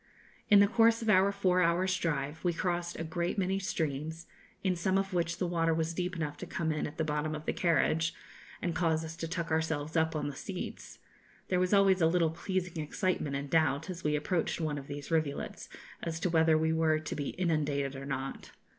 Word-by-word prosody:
In 205 -1 +8
the 200 - +6
course 230 +1 +4
of 225 - -1
our 190 0 +5
four 185 -2 +2
hours' 180 +2 +2
drive, 150 -3 -2
we 175 -1 +2
crossed 175 0 -2
a - - -2
great 170 +4 -2
many 190 0 +1
streams, 160 -4 -3 0.4
in 185 -2 +2
some 185 +3 +1
of 195 0 -1
which 170 -1 0
the 185 - -1
water 165 -2 +1
was 160 +1 -1
deep 180 +1 -2
enough 150 -3 -3
to - - -7
come 160 -1 -1
in 155 - -1
at 150 - -10
the 160 - +1
bottom 150 0 -1
of 155 +1 -7
the - - 0
carriage, 165 -1 +2 0.5
and 175 - 0
cause 160 -1 +1
us 160 +1 -7
to 165 - -3
tuck 170 -1 -3
ourselves 160 -1 -1
up 160 -1 +2
on 145 -1 -1
the 145 - -5
seats; 185 +6 -6 0.5
there 180 - +2
was 180 0 +1
always 195 -2 +5
a 160 - +6
little 165 -1 +2
pleasing 180 0 -3
excitement 150 -2 -1
and 140 0 -4
doubt, 160 +1 +2
as 180 0 -8
we 150 0 +1
approached 165 +4 -1
one 155 -3 -1
of 135 - -11
these 145 +2 -7
rivulets, 155 -3 -2 0.3
as 165 -1 -3
to 175 +1 0
whether 160 -1 +4
we 160 +1 +1
were 160 -1 +3
to 155 0 -5
be 145 -2 -3
inundated 145 -5 0
or 135 +1 -7
not. 135 -1 -4
165 Hz, 215 wpm, -31 LUFS, 155-180 Hz, 0.5 s, In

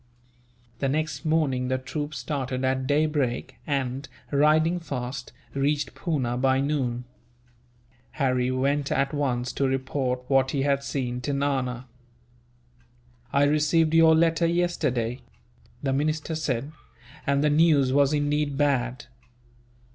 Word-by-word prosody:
The 135 - 0
next 155 +3 -2
morning 145 -5 +1
the 130 0 0
troop 145 +3 -5
started 130 0 -3
at 130 0 0
daybreak 145 -4 0
and, 135 -1 -2 0.2
riding 155 +4 +3
fast, 125 -5 -5 0.2
reached 145 +2 0
Poona 130 -8 -2
by 130 0 +3
noon. 135 -4 -1 1.1
Harry 130 -3 +1
went 140 +2 0
at 140 +2 +1
once 130 -4 -1
to 135 - +1
report 130 -1 -1
what 135 -1 +3
he 135 -1 -1
had 140 -1 +1
seen 125 -3 -3
to 145 +3 -2
Nana. 130 -3 -1 1.5
"I 140 - +3
received 155 +2 +3
your 165 -1 +6
letter 165 +1 +3
yesterday," 130 -9 0 0.6
the 135 -1 0
minister 155 +3 -1
said, 145 -3 -2 0.6
"and 140 +1 +2
the 150 - +3
news 145 -4 +4
was 140 0 +4
indeed 145 -1 0
bad. 130 -4 0
140 Hz, 125 wpm, -26 LUFS, 130-150 Hz, 1.5 s, your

